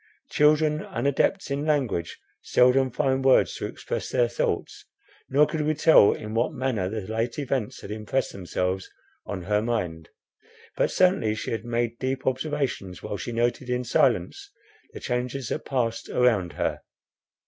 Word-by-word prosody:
Children, 150 +1 +3
unadepts 140 +5 0
in 140 +1 -1
language, 135 - -1 0.2
seldom 130 +1 +4
find 130 +2 0
words 135 -1 +4
to - - -3
express - - -5
their 120 - +2
thoughts, 120 - -2 0.5
nor 145 +3 +5
could 155 0 -3
we 155 +1 +1
tell 155 -8 +6
in 110 0 -5
what 120 +7 0
manner 125 -9 -1
the 110 +1 -3
late 115 +4 -3
events 135 -6 -2
had 100 - -8
impressed 110 +5 -2
themselves 90 0 -3 0.4
on 95 -3 -4
her 105 +3 +1
mind. 90 -9 -3 0.7
But - - +1
certainly 180 - +2
she - - -4
had 115 0 -3
made 120 0 -1
deep 130 0 -2
observations 130 - -2
while 100 - -4
she 120 - -5
noted 120 +2 -1
in 125 0 0
silence 395 - +1 0.4
the - - -8
changes 125 0 -3
that 155 - -3
passed 115 -4 -2
around 110 -8 +2
her. - - -2
125 Hz, 155 wpm, -25 LUFS, 110-135 Hz, 0.7 s, tell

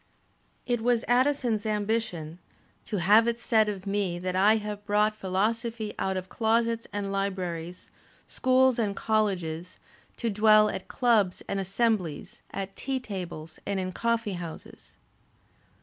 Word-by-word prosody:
It 240 -2 0
was 240 0 +1
Addison's 245 -3 +2
ambition 205 -6 -2 0.5
"to 210 - -3
have 210 +6 +6
it 235 0 0
said 220 -2 +3
of 195 -2 -5
me 195 -3 -1
that 180 +1 -3
I 205 +4 +5
have 210 -1 -4
brought 210 0 +2
philosophy 215 +3 -1
out 190 0 0
of 185 0 -5
closets 230 +2 0
and 205 -1 -3
libraries, 180 -3 -3 0.3
schools 260 -1 +3
and 205 -3 0
colleges, 185 -7 -1 0.4
to 230 -2 -1
dwell 215 0 +5
at 185 - -6
clubs 225 -7 +2
and 195 - -2
assemblies, 195 -5 -1
at 195 0 -5
tea 265 -1 -2
tables 175 -8 -7
and 200 -1 -2
in 185 0 -3
coflfee 230 -3 -1
houses." 170 -2 -9
210 Hz, 135 wpm, -27 LUFS, 185-230 Hz, 0.5 s, have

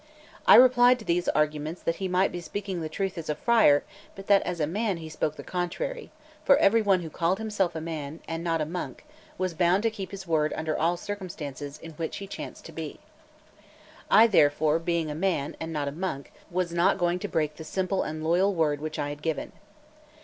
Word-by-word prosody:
I - - +10
replied 250 +1 +7
to 220 - -12
these 175 +1 +1
arguments 150 +2 -1
that 165 0 -1
he 190 - -2
might 185 +1 +2
be 175 - -5
speaking 190 0 -4
the 155 - -4
truth 190 +2 -3
as 160 - -7
a 150 - 0
friar, 215 -6 +4 0.3
but 195 -1 -9
that 200 -1 +5
as 175 -1 -4
a 150 - +2
man 200 +4 -1
he 160 -1 -8
spoke 155 -1 -2
the - - -9
contrary; 470 - -3 0.3
for 280 - +6
every 225 +3 +4
one 195 -3 +3
who 165 - -6
called 170 +4 0
himself 205 -6 -1
a - - -2
man, 155 -1 -5
and 165 0 -4
not 165 -2 0
a - - 0
monk, 175 - -6 0.3
was 185 -1 -1
bound 180 +4 +2
to 225 - +2
keep 195 -4 -6
his 195 -1 -8
word 155 -3 +1
under 155 -1 -2
all 170 +2 +1
circumstances 165 -8 -6
in 165 - -10
which 160 +1 -5
he 200 - -6
chanced 195 - -8
to - - -9
be. - - -7 1.1
I 225 - +8
therefore, 155 -6 +3
being 165 -2 -1
a - - -3
man, 160 -3 -1
and 160 0 -5
not 150 -3 -2
a - - -2
monk, 150 -3 -4 0.2
was 175 -1 -1
not 175 +3 +3
going 175 -1 +1
to 205 - -4
break 155 -4 -1
the 160 - -7
simple 190 +3 -1
and 155 0 -4
loyal 185 +5 +2
word 150 -3 +1
which 155 0 -4
I 145 - -2
had 145 0 -7
given. 160 -1 -3
170 Hz, 220 wpm, -27 LUFS, 155-195 Hz, 1.1 s, I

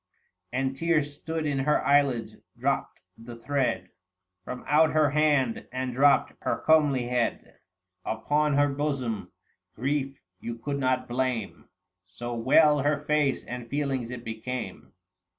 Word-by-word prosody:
810 130 +2 0
And - - -12
tears 150 -1 +1
stood 160 +2 -4
in 145 -2 0
her 150 +3 +1
eyelids, 140 -5 +2 0.2
clropt - - -1 0.2
the 115 +1 -9
thread 125 -6 -1 0.5
From 125 +4 -7
out 155 +1 +4
her 155 -3 +3
hand, 145 -5 +1
and 130 0 -3
dropped 140 +1 +4
her - - -1
comely 150 -5 +4
head 120 -1 -2 0.4
Upon 145 +6 0
her 145 0 +4
bosom; 135 -7 -2 0.4
grief 135 +2 -2 0.2
you 120 - -5
could 140 +4 -3
not 130 -1 0
blame, 120 - -3 0.4
So 120 +6 -6
well 145 +6 +4
her 145 +1 +2
face 150 -3 +1
and 120 -1 -7
feelings 135 -4 -2
it 125 -1 -7
became. 115 +2 -6
135 Hz, 135 wpm, -27 LUFS, 120-145 Hz, 0.5 s, out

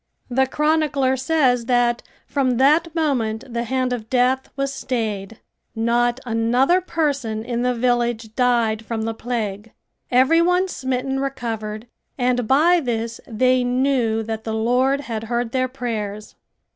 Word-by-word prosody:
The 265 +2 +2
chronicler 300 -2 +1
says 260 -3 +1
that 240 -1 +2 0.2
from 260 -4 0
that 310 +5 +3
moment 245 -9 0
the 235 0 -1
hand 255 +1 0
of 225 -2 -5
death 260 +1 +1
was 275 0 -2
stayed. 220 -6 -3 0.4
Not 240 +2 +1
another 245 +9 +2
person 280 -11 -2
in 240 -1 -2
the 250 0 +1
village 240 -2 0
died 235 -3 +1
from 225 -1 -3
the 225 0 -2
plague. 225 -3 -4 0.4
Every 260 +7 +4
one 360 +2 +2
smitten 265 -3 -2
recovered 225 -5 -4 0.3
and 245 -2 +1
by 325 +8 +4
this 230 -4 -3
they 255 +2 +2
knew 245 -3 +1
that 220 0 -5
the 220 -1 -3
Lord 250 +5 +2
had 225 -5 -5
heard 235 0 -2
their 255 0 +1
prayers. 220 -5 -5
245 Hz, 140 wpm, -21 LUFS, 225-265 Hz, 0.4 s, Every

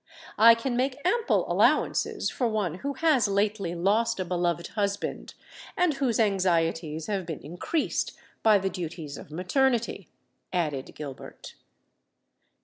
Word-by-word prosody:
I 230 +1 +9
can 240 +2 -2
make 255 +1 0
ample 455 +5 +2
allowances - - +2
for 245 - 0
one 200 -6 -2
who 280 +5 -3
has 280 -5 +3
lately 200 -3 0
lost 210 +6 +1
a 185 - -1
beloved 175 -1 -1
husband, 200 -2 -3 0.4
and 355 -3 +3
whose 265 -5 0
anxieties 165 -6 +1
have 200 -3 -2
been 160 -4 -5
increased 175 - -2 0.3
by 215 -2 +6
the 195 0 -2
duties 165 -4 -6
of - - -11
maternity," 235 - 0 0.4
added 150 -7 -2
Gilbert. 140 -3 -9
200 Hz, 130 wpm, -27 LUFS, 170-235 Hz, 0.4 s, I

